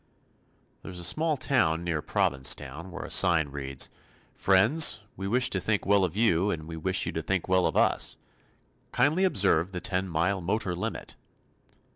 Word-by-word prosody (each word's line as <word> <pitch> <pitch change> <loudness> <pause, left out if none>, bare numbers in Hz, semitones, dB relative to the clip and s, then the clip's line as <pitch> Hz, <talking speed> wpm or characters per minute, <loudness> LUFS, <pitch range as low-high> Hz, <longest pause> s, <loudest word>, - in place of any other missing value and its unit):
There - - -10
is 90 - -9
a 90 - -3
small 155 - +1
to 120 - +1
near 85 -2 -3
Provincetown 70 +6 -1
where 95 +2 -8
a - - -10
sign 85 -6 +4
reads 70 -1 -2 0.4
"Friends, 110 +5 +3
we 95 +1 -6
wish 125 +5 +2
to 95 - -1
think 105 +1 -1
well 100 -1 +3
of 90 +1 -3
you 105 -4 +2
and 80 -5 -4
we 80 - -7
wish 80 - 0
you - - -3
to - - -4
think 95 -3 -3
well 95 -1 +2
of - - -3
us. - - +1 0.7
Kindly 150 +9 +1
observe 95 - +2
the 90 - -4
ten 95 +1 -3
mile 90 +4 -1
motor 95 +1 -2
limit." 90 - -6
95 Hz, 175 wpm, -27 LUFS, 80-105 Hz, 0.7 s, sign